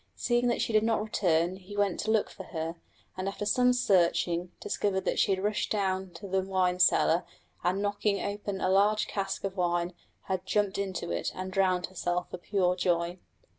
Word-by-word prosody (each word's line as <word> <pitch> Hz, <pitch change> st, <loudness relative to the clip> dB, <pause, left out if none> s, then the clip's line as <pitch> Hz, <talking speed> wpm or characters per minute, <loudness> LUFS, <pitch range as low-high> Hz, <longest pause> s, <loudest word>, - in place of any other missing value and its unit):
Seeing 240 Hz, 0 st, +1 dB
that 240 Hz, -, +1 dB
she 230 Hz, -, -2 dB
did 215 Hz, -, +5 dB
not 225 Hz, 0 st, +1 dB
return, 175 Hz, -4 st, +1 dB
he 195 Hz, +2 st, -10 dB
went 200 Hz, -3 st, +1 dB
to 215 Hz, -, -2 dB
look 220 Hz, -1 st, +2 dB
for -, -, -9 dB
her, 165 Hz, -1 st, -4 dB, 0.4 s
and 185 Hz, +1 st, -3 dB
after 200 Hz, +1 st, -3 dB
some 250 Hz, +4 st, +4 dB
searching 180 Hz, -6 st, +2 dB
discovered 195 Hz, -2 st, -1 dB
that -, -, -1 dB
she -, -, +3 dB
had 190 Hz, 0 st, 0 dB
rushed 210 Hz, +1 st, 0 dB
down 190 Hz, -2 st, 0 dB
to 200 Hz, -, -8 dB
the 190 Hz, 0 st, +1 dB
wine 185 Hz, -1 st, 0 dB
cellar 175 Hz, -1 st, +4 dB, 0.4 s
and 185 Hz, +3 st, +1 dB
knocking 205 Hz, 0 st, 0 dB
open 205 Hz, -1 st, -4 dB
a -, -, +1 dB
large 205 Hz, +3 st, +3 dB
cask 195 Hz, -1 st, -3 dB
of 195 Hz, -1 st, -3 dB
wine 175 Hz, -1 st, 0 dB, 0.3 s
had 190 Hz, -1 st, -2 dB
jumped 205 Hz, -2 st, +1 dB
into 190 Hz, -, -3 dB
it 85 Hz, -, -1 dB
and 185 Hz, 0 st, -5 dB
drowned 185 Hz, -2 st, +2 dB
herself 180 Hz, -1 st, -3 dB
for 180 Hz, -, -6 dB
pure 180 Hz, -1 st, +1 dB
joy. 175 Hz, 0 st, 0 dB
190 Hz, 195 wpm, -29 LUFS, 180-205 Hz, 0.4 s, did